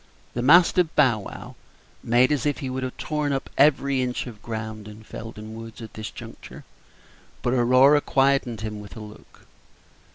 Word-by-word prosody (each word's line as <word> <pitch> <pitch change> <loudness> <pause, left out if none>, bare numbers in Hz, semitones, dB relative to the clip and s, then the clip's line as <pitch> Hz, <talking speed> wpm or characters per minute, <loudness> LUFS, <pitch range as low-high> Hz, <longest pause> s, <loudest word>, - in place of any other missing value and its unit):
The 120 - -2
mastiff 170 +5 +5
Bow 125 -7 +4
wow 100 - -9 0.5
made 120 +3 +3
as 150 -1 0
if 145 - 0
he 135 -3 -5
would 130 +1 -3
have 130 -1 -5
torn 150 -2 -2
up 135 -1 -3
every 140 -2 +3
inch 125 -1 -2
of 115 -5 -10
ground 110 -2 -6
in 105 +1 -12
Felden 110 0 -9
Woods 115 -1 -9
at 115 -2 -10
this 110 0 -6
juncture; - - -11 0.8
but 120 - +1
Aurora 130 +4 +5
quieted 135 -6 +1
him 105 -1 -5
with 105 +2 -11
a - - -7
look. 105 0 -14
125 Hz, 170 wpm, -24 LUFS, 110-140 Hz, 0.8 s, mastiff